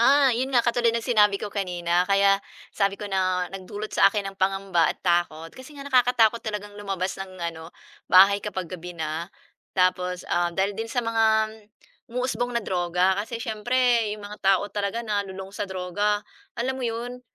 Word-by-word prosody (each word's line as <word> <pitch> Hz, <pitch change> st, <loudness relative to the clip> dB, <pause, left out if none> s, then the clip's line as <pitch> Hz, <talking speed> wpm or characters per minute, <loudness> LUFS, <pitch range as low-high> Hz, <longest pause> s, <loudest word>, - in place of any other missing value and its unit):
Ah, 270 Hz, +1 st, +5 dB
'yon 255 Hz, +3 st, -1 dB
nga, 245 Hz, -3 st, +2 dB
katulad 235 Hz, 0 st, +2 dB
ng 230 Hz, 0 st, 0 dB
sinabi 210 Hz, -5 st, +4 dB
ko 205 Hz, 0 st, -6 dB
kanina 180 Hz, -2 st, 0 dB
kaya 195 Hz, 0 st, +4 dB, 0.3 s
sabi 200 Hz, 0 st, 0 dB
ko 210 Hz, -, -7 dB
na 185 Hz, -2 st, 0 dB
nagdulot 205 Hz, +3 st, -7 dB
sa 195 Hz, -, +6 dB
akin 200 Hz, 0 st, -2 dB
ng 195 Hz, -, -27 dB
pangamba 195 Hz, -3 st, +2 dB
at -, -, -2 dB
takot 170 Hz, -2 st, 0 dB
kasi 265 Hz, +3 st, -13 dB
nga 280 Hz, -, -8 dB
nakakatakot 245 Hz, -4 st, +3 dB
talagang 210 Hz, -2 st, -5 dB
lumabas 190 Hz, -2 st, -2 dB
ng 195 Hz, -, -5 dB
ano, 165 Hz, -2 st, -5 dB, 0.4 s
bahay 200 Hz, +2 st, +7 dB
kapag 185 Hz, -4 st, -5 dB
gabi 175 Hz, -1 st, -7 dB
na. 160 Hz, +2 st, -3 dB, 0.5 s
Tapos, 180 Hz, 0 st, +1 dB
um, 175 Hz, 0 st, 0 dB
dahil 195 Hz, +1 st, +1 dB
din 225 Hz, +3 st, -5 dB
sa 245 Hz, 0 st, -1 dB
mga 220 Hz, -1 st, +2 dB, 0.6 s
umuusbong 245 Hz, 0 st, -2 dB
na 235 Hz, -, -1 dB
droga 180 Hz, +2 st, +1 dB
kasi 230 Hz, +3 st, -5 dB
siyempre 235 Hz, 0 st, +1 dB
'yong 205 Hz, -, -11 dB
mga 210 Hz, +1 st, -8 dB
tao 195 Hz, 0 st, +3 dB
talaga 205 Hz, +3 st, -2 dB
na 210 Hz, -2 st, 0 dB
lulong 190 Hz, +1 st, -8 dB
sa 205 Hz, -1 st, -4 dB
droga, 205 Hz, +3 st, -1 dB, 0.3 s
alam 260 Hz, +2 st, -2 dB
'yon, 240 Hz, +1 st, -4 dB
205 Hz, 175 wpm, -25 LUFS, 185-230 Hz, 0.6 s, bahay